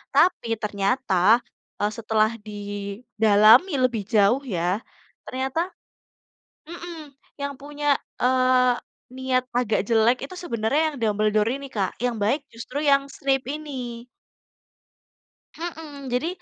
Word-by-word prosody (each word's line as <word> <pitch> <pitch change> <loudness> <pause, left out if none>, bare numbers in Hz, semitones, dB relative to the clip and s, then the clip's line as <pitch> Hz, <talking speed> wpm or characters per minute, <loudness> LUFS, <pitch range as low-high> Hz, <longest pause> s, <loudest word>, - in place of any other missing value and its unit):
Tapi 355 -9 +4 0.2
ternyata, 205 +2 0 0.6
eee, 205 +1 +1
setelah 220 0 +1 0.2
didalami 210 - +3
lebih 240 -5 +1
jauh 220 +6 +4
ya 175 +4 0 0.4
ternyata 265 +3 -3 1.1
mhm, 340 -3 -8 0.3
yang 280 0 -2
punya, 290 0 0 0.2
eee, 255 -1 +4 0.4
niat 260 -1 +1
agak 225 -5 +1
jelek 230 +2 +3
itu 370 - -9
sebenernya 230 +1 0
yang - - -8
Dumbledore 215 0 +2
ini 280 - -8
Kak, 195 -4 -2
yang 245 - 0
baik 275 +8 +1
justru 235 +4 -7
yang 275 0 +3
Snape 270 -1 0
ini. 255 -6 -6 1.5
Mhm, 310 -6 -7
jadi, 250 +6 0
250 Hz, 110 wpm, -24 LUFS, 215-280 Hz, 1.5 s, Tapi